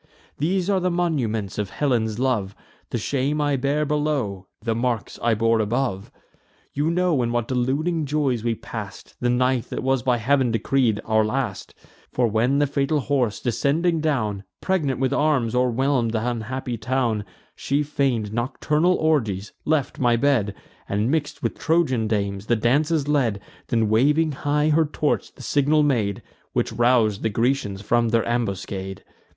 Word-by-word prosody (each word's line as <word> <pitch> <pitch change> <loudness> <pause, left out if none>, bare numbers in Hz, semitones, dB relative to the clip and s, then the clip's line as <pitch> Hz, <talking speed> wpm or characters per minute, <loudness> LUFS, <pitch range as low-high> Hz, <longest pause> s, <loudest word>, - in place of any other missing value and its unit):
These 180 +4 0
are 200 -2 +2
the 180 0 0
monuments 125 - -1
of 100 -2 -2
Helen's 110 -1 0
love: 115 -7 0 0.3
The - - -2
shame 140 +5 -1
I 145 -1 +1
bear 140 +3 0
below, 140 -11 -1
the 115 0 -1
marks 115 -1 -2
I 115 -1 +2
bore 115 +1 +2
above. 110 -2 -1 0.6
You 145 +3 0
know 170 -5 +2
in 120 -1 0
what 120 -1 -1
deluding 145 +6 0
joys 135 -6 0
we 115 -1 0
pass'd - - -8
The 120 - 0
night 125 0 +1
that - - -5
was 130 -1 +1
by 125 -1 +2
Heav'n 130 +2 +2
decreed 115 -1 +1
our 110 0 +3
last: 110 -2 -3 0.4
For, 125 - +1
when 115 +5 +2
the 145 - +3
fatal 140 +1 0
horse, 130 -6 0
descending 155 +7 +1
down, 110 -10 -1 0.2
Pregnant 155 -10 0
with 135 0 +1
arms, 140 -7 +1
o'erwhelm'd 125 -1 +1
th' 110 -1 0
unhappy 120 +1 -3
town 120 -4 0 0.3
She 140 +2 0
feign'd 130 -7 -1
nocturnal 150 +8 +1
orgies; 110 -11 0
left 155 -3 0
my 120 -2 +3
bed, 115 -6 +1 0.3
And, 105 +5 0
mix'd 150 -2 -2
with - - -2
Trojan 155 -9 +1
dames, 100 -1 -2
the 120 - +3
dances 145 +7 +1
led 130 -9 +1 0.3
Then, 115 -2 +1
waving 145 +9 +3
high 150 +2 0
her 160 +1 +4
torch, 150 0 -1
the - - -11
signal 145 +2 +2
made, 115 -9 0 0.3
Which - - 0
rous'd 120 -4 +3
the 110 - 0
Grecians 110 -3 -1
from 115 +2 +2
their 115 0 +1
ambuscade. 100 -4 -3
125 Hz, 160 wpm, -23 LUFS, 110-145 Hz, 0.6 s, her